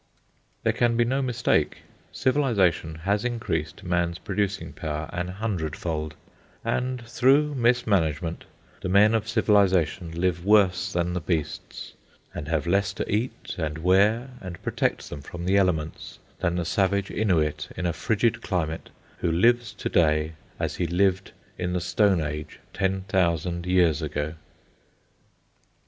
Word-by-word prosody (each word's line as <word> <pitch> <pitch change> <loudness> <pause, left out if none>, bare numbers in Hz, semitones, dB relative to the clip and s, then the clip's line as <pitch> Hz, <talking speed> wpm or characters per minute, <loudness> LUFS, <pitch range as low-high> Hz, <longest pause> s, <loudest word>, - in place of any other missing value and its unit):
There - - +2
can 120 -1 +2
be 120 - +4
no 135 +3 0
mistake. 125 - +1 0.3
Civilisation 105 - +1
has 100 +1 +1
increased 80 -11 -3
man's 85 -1 0
producing 100 0 -2
power 75 -1 -4
an 90 0 -2
hundred 90 -5 -3
fold, 80 -3 -3 0.5
and 125 -1 -1
through 135 +6 +3
mismanagement 100 - +1 0.4
the - - -3
men 105 +3 +5
of 110 -1 0
Civilisation 95 -6 +2
live 85 -1 0
worse 100 -1 +3
than 85 -1 0
the 90 - -2
beasts, 80 -2 -3 0.4
and 75 - -6
have 80 -1 0
less 100 +3 +1
to - - -4
eat 115 +5 -2
and 80 -2 -2
wear 100 +9 +3
and 90 -2 -7
protect - - -1
them 75 - -6
from 85 +4 -7
the 95 +2 +2
elements 80 -5 -1 0.2
than 85 0 0
the 90 -1 -1
savage 100 +2 +1
Innuit 80 -8 0
in 90 - -2
a 85 - +1
frigid 115 +6 0
climate 80 -6 -2 0.3
who 85 - 0
lives 115 +6 +3
to - - -4
day 75 -1 +2 0.3
as - - -2
he 90 - 0
lived 95 +2 +1 0.3
in 90 0 -1
the 90 - +1
stone 90 +1 +2
age 75 0 -5 0.2
ten 95 0 0
thousand 85 -2 0
years 85 -4 +3
ago. 75 0 -3
90 Hz, 145 wpm, -26 LUFS, 80-105 Hz, 0.5 s, men